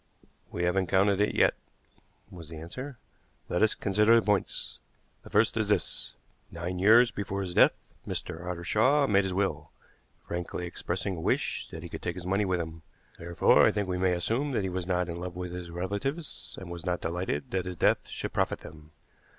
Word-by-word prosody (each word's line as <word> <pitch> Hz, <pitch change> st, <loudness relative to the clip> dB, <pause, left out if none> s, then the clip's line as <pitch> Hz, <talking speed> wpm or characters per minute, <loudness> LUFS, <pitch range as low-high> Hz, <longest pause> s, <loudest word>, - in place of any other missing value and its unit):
"We 85 Hz, -, -2 dB
haven't 90 Hz, +1 st, +1 dB
counted 100 Hz, +2 st, +3 dB
it 105 Hz, -, +1 dB
yet," -, -, +5 dB, 0.8 s
was 85 Hz, -3 st, -10 dB
the 80 Hz, -, -8 dB
answer. 125 Hz, -, -7 dB, 0.5 s
"Let 90 Hz, -, 0 dB
as 110 Hz, 0 st, +4 dB
consider 105 Hz, +3 st, +4 dB
the 115 Hz, -, +3 dB
points. 105 Hz, -3 st, -1 dB, 0.4 s
The -, -, -13 dB
first -, -, +3 dB
is -, -, 0 dB
this: -, -, 0 dB, 0.3 s
Nine 85 Hz, +2 st, -4 dB
years 115 Hz, +5 st, +6 dB
before 100 Hz, -1 st, -3 dB
his 90 Hz, -2 st, -4 dB
death -, -, +6 dB, 0.3 s
Mr. 85 Hz, +2 st, -4 dB
Ottershaw 105 Hz, -, +2 dB
made 100 Hz, -1 st, +3 dB
his 95 Hz, -, -2 dB
will, 80 Hz, -6 st, -1 dB, 0.6 s
frankly 90 Hz, 0 st, -4 dB
expressing 90 Hz, +2 st, -3 dB
a -, -, -5 dB
wish -, -, 0 dB
that -, -, -8 dB
he -, -, -7 dB
could -, -, -7 dB
take 85 Hz, -, -3 dB
his 90 Hz, -1 st, -7 dB
money 95 Hz, +3 st, +1 dB
with 90 Hz, -2 st, 0 dB
him. 80 Hz, 0 st, -5 dB, 0.4 s
Therefore, 85 Hz, +1 st, +4 dB
I -, -, +4 dB
think 105 Hz, -2 st, -1 dB
we 90 Hz, -1 st, -2 dB
may 90 Hz, -1 st, +3 dB
assume 115 Hz, +11 st, -1 dB
that 110 Hz, -, +1 dB
he 95 Hz, -, -1 dB
was 90 Hz, -1 st, -3 dB
not 90 Hz, -1 st, +1 dB
in 85 Hz, 0 st, -5 dB
love 90 Hz, 0 st, -5 dB
with 90 Hz, -1 st, -5 dB
his 90 Hz, -1 st, -6 dB
relatives, 100 Hz, -, -4 dB
and 95 Hz, -3 st, -8 dB
was 85 Hz, -1 st, -6 dB
not 90 Hz, -1 st, -1 dB
delighted 85 Hz, -3 st, -3 dB
that 95 Hz, -1 st, -1 dB
his 90 Hz, 0 st, -4 dB
death -, -, +2 dB
should -, -, -5 dB
profit -, -, 0 dB
them. 75 Hz, -1 st, -12 dB
90 Hz, 200 wpm, -29 LUFS, 85-100 Hz, 0.8 s, years